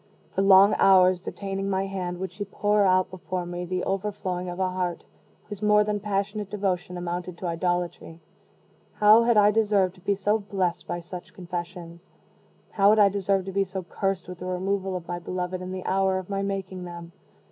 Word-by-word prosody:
For - - 0
long 195 +1 +7
hours, 185 -2 +5
detaining 195 0 -4
my 190 0 0
hand, 185 -2 -4
would 190 0 -5
she 200 +3 -5
pour 205 +1 +1
out 185 0 +2
before 185 -1 -4
me 175 0 -5
the 180 +1 -2
overflowing 190 -2 -3
of 175 +1 -6
a 190 - +2
heart 180 -2 -3 0.4
whose 205 -1 -9
more 210 0 +5
than 210 0 -1
passionate 205 0 -2
devotion 185 -3 -2
amounted 175 0 -4
to 185 - -7
idolatry. 175 -1 -2 0.7
How 215 +2 +6
had 235 -2 +3
I 210 0 +6
deserved 205 -4 +2
to 185 - -20
be 200 +2 0
so 205 +3 +1
blessed 190 -4 -2
by 175 - -3
such 175 +1 -10
confessions? 175 -1 -7 0.6
how 200 -1 +4
had 215 - +5
I 205 -2 +6
deserved 195 -1 0
to 195 - -5
be 195 +1 +1
so 190 0 -6
cursed 195 0 -2
with 180 -1 -8
the 180 - -6
removal 190 +1 -1
of 175 -2 -6
my 175 0 -3
beloved 180 +1 -4
in 185 0 -6
the 185 -1 -6
hour 190 0 +1
of 185 +1 -6
my 195 0 -1
making 195 -2 -4
them? 170 -1 -9
190 Hz, 195 wpm, -26 LUFS, 180-200 Hz, 0.7 s, long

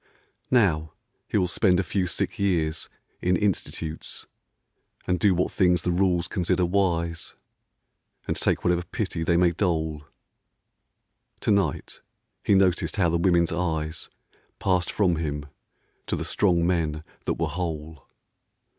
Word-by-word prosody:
Now, 85 -11 +2 0.3
he - - 0
will 95 - +3
spend 90 0 +2
a - - +1
few 95 +1 -1
sick 85 - -3
years 85 -5 0 0.3
in 90 0 +2
institutes, 80 -5 -2 0.8
And 90 -1 0
do 95 0 +4
what 90 - 0
things 90 -3 +3
the 90 - +1
rules 90 -1 +2
consider 90 0 +1
wise, 85 -3 -1 0.9
And - - 0
take - - 0
whatever 90 0 +2
pity 90 -1 -4
they 85 +1 +2
may 90 -1 +4
dole. 80 -4 -1 1.4
To - - +1
night 100 -1 0 0.4
he 100 - +4
noticed 95 -2 +2
how 90 -5 +3
the 85 +1 +1
women's 85 -1 +3
eyes 80 -2 -2 0.5
Passed 90 -2 +1
from 90 -6 +2
him 75 -2 -3 0.6
to - - 0
the - - -3
strong 85 -4 +2
men 80 -3 0 0.2
that - - 0
were - - -1
whole. 80 -4 -5
90 Hz, 135 wpm, -26 LUFS, 80-95 Hz, 1.4 s, do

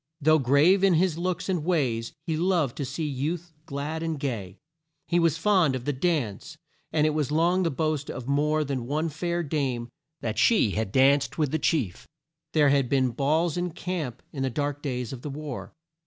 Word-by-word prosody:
Though 155 +1 +4
grave 145 +9 +4
in 190 -3 +5
his 170 -1 +1
looks 180 0 -2
and 180 -5 0
ways, 130 -10 0
he 160 -3 -1
loved 165 -6 +1
to 140 - -2
see 140 +5 -3
youth 160 +5 -3
glad 150 +2 -4
and 160 -2 -2
gay. 110 -9 -4 0.5
He 175 - +2
was 165 -2 +2
fond 170 -6 +3
of 125 -1 -5
the 145 - 0
dance, 145 - -2 0.3
and 150 -1 +2
it 155 - +3
was 150 -2 -1
long 170 +4 +3
the 170 - +2
boast 155 -1 -1
of 125 -2 -6
more 150 +2 +2
than 130 -4 -3
one 155 +4 0
fair 170 +3 -2
dame 135 -6 -2 0.3
that 110 -1 -2
she 215 - +4
had 110 0 -2
danced 135 +3 +3
with 150 -4 +1
the 160 - 0
chief. 125 - -1 0.5
There 150 -3 +5
had 140 -3 +2
been 130 -2 +2
balls 155 +7 +1
in 175 -1 -2
camp 160 -9 -4
in 140 - -4
the 135 - +1
dark 145 +2 -2
days 125 -4 -3
of 125 - -8
the 145 - -5
war. 145 -2 -6
150 Hz, 200 wpm, -26 LUFS, 135-165 Hz, 0.5 s, in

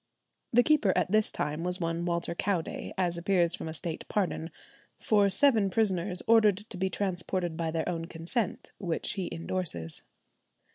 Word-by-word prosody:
The 245 +1 +6
keeper 275 -11 +4
at 185 - +1
this 215 0 +3
time 150 +3 -2
was 180 +1 0
one 165 0 -1
Walter 170 -1 0
Cowday, 175 -1 -2
as 175 -2 0
appears 175 -2 +2
from - - -5
a 160 - -4
State 165 0 -4
pardon 175 -5 -1 0.5
"for 205 -2 +3
seven 215 -1 +4
prisoners 185 -3 0
ordered 215 -4 +5
to 210 -1 -8
be 190 +1 0
transported 180 -3 -2
by 165 0 -1
their 160 0 -2
own 165 -2 -2
consent," 175 +6 -3
which 175 -5 -2
he 195 -3 -3
endorses. 165 - -3
180 Hz, 160 wpm, -29 LUFS, 170-205 Hz, 0.5 s, The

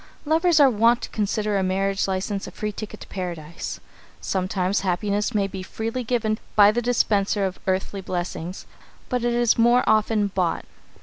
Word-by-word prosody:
Lovers 320 +2 +3
are 285 - +8
wont 235 0 +3
to - - -5
consider 210 -1 -1
a - - +1
marriage 195 +1 0
license 195 +1 -2
a - - -8
free 210 0 -4
ticket 215 +1 -8
to - - -10
Paradise. 170 -4 -6 0.4
Sometimes 185 +1 -1
happiness 200 +4 -1
may 200 -1 +2
be 195 -1 -6
freely 225 +6 -4
given 220 -2 0 0.2
by 205 -1 +7
the 240 +3 -1
dispenser 210 -4 +1
of 190 -1 -4
earthly 190 +1 -1
blessings, 180 -1 -5 0.4
but 250 -1 -1
it 240 0 +1
is 240 -1 +3
more 240 +2 +5
often 215 -1 +2
bought. 185 -4 -1
205 Hz, 170 wpm, -24 LUFS, 190-230 Hz, 0.4 s, are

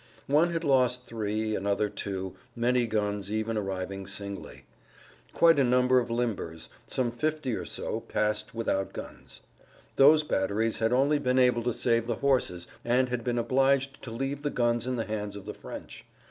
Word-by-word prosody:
One 155 +5 +3
had 170 0 -2
lost 125 -3 +2
three, 110 -1 -2
another 100 +2 0
two; 95 -2 -5 0.2
many 120 0 +2
guns 105 -2 -1
even 110 +1 -1
arriving 95 -1 -3
singly. 100 -1 -6 0.7
Quite 165 -3 +5
a - - +5
number 125 +1 +4
of 120 - -3
limbers, 115 -9 -3 0.2
some 125 -2 0
50 155 +1 -1
or - - -5
so, - - -3
passed 105 +1 -2
without 95 -4 -1
guns. - - -9 0.6
Those 150 +3 +7
batteries 110 -4 0
had 110 +1 +1
only 140 +4 +3
been 125 -2 +1
able 125 -2 +4
to 120 +1 0
save 115 0 +1
the 120 - 0
horses 125 -11 0 0.2
and 125 +2 +2
had 125 -1 -2
been 120 0 -1
obliged 135 +3 +2
to 130 - -8
leave 135 +5 -3
the 145 - -1
guns 120 -2 0
in 130 - 0
the 115 - -2
hands 105 -1 -4
of 100 -1 -9
the 105 - -5
French. - - -9
120 Hz, 175 wpm, -28 LUFS, 105-130 Hz, 0.7 s, Those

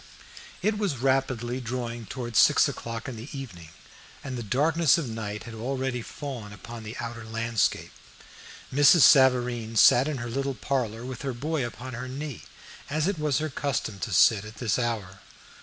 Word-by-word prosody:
It 210 0 +1
was 195 -10 -1
rapidly 130 -1 0
drawing 120 -2 -4
towards 120 -4 -1
six - - +6
o'clock 115 -1 -5
in 125 -3 -6
the 115 +6 -8
evening, 90 -12 -9 0.5
and 130 -2 -5
the 120 - -4
darkness 150 - +3
of 160 -6 -2
night 105 -2 -5
had 115 - -9
already 130 +2 -2
fallen 120 -5 -7
upon 115 +3 -9
the 110 +3 -8
outer 115 -1 -5
landscape. 115 -1 -1 0.8
Mrs. 145 +4 +6
Savareen 125 -5 +5
sat 125 +5 +6
in 150 -3 -2
her 120 -1 -5
little 135 +2 -2
parlor 120 -5 -2
with 130 -2 -6
her 135 -2 -3
boy 150 +4 -2
upon 120 +2 -6
her 125 +2 -5
knee, 140 0 -6 0.5
as 155 +3 0
it 195 -5 -1
was 150 -2 +1
her 155 +1 -1
custom 130 -7 -3
to - - -4
sit 105 -3 +5
at 110 +1 -10
this 110 +1 0
hour. 105 -6 -3
125 Hz, 175 wpm, -27 LUFS, 115-135 Hz, 0.8 s, six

